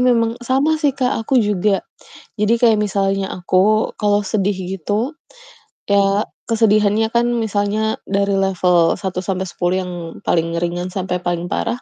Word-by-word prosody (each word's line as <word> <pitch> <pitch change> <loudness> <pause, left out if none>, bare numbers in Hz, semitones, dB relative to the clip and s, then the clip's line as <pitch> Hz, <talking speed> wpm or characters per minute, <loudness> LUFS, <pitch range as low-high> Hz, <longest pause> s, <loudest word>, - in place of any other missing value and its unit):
memang 235 -2 +2
sama 270 +6 +1
sih 290 -4 +1
Kak, 255 -2 0
aku 260 +4 0
juga, 205 -1 +1 0.5
jadi 215 +2 +2
kayak 230 -2 +5
misalnya 195 -1 0
aku 195 +4 +1
kalau 205 -1 +2
sedih 200 -1 0 0.2
gitu, 210 - -2 0.7
ya 200 +1 +3 0.2
kesedihannya 215 -1 +2
kan 235 0 +2
misalnya 215 0 -1
dari 200 0 0
level 180 -3 +2
1-10 185 -1 -2
yang 180 - -6 0.3
paling 165 0 0
ringan 175 +1 -2
sampai 185 -1 -2
paling 175 0 -3
parah. 235 +2 -2
205 Hz, 130 wpm, -19 LUFS, 185-225 Hz, 0.7 s, kayak